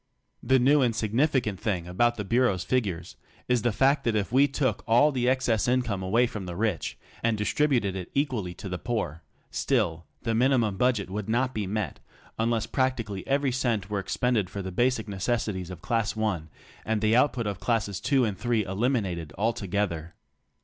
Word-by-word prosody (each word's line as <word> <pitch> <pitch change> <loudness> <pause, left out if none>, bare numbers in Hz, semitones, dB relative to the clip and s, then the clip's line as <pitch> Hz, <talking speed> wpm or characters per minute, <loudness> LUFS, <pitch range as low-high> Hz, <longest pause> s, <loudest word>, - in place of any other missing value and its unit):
The 130 +2 +3
nezv 135 +3 +4
and 120 -3 +1
significant 115 - +1
thing 90 -6 -2
about 120 +7 +2
the 105 - -4
Bureau's 115 -5 +2
figures 95 -9 -2 0.3
is 125 -2 +2
the 120 +1 +1
fact 135 +6 +3
that 115 -2 +1
if 105 -1 -1
we 135 +3 +5
took 135 -5 -1
all 120 +7 +5
the 125 -2 +1
excess 125 -5 +1
income 120 -6 +1
away 110 +7 +3
from 105 -5 -6
the 90 - -5
rich 105 -3 -1 0.2
and 115 -1 +1
distributed 115 -2 +1
it 95 -2 -5
equally 120 -11 -1
to - - -8
the 90 -1 -4
poor, 95 -10 -3 0.3
still 85 - 0 0.2
the 115 - 0
minimum 120 -3 +2
budget 120 -5 +1
would 105 +1 -4
not 125 +3 +1
be 105 -4 -2
met 100 -5 -3 0.4
unless 115 -1 +1
practically 115 -7 -2
every 140 -1 +1
cent 115 -6 -1
were 100 - 0
expended 105 0 0
for 100 +1 -5
the 95 - -5
basic 120 +2 +1
necessities 100 -2 -2
of 90 -2 -9
class 115 -2 0
one, 100 -8 -1 0.3
and 110 -1 -1
the 110 +1 +3
out 130 +4 +5
put 120 -3 -3
of 100 -2 -3
classes 100 0 0
two 135 -4 +2
and 100 -4 -3
three 120 -4 +1
eliminated 95 - -1
altogether. 100 -6 -1
110 Hz, 185 wpm, -27 LUFS, 95-125 Hz, 0.4 s, we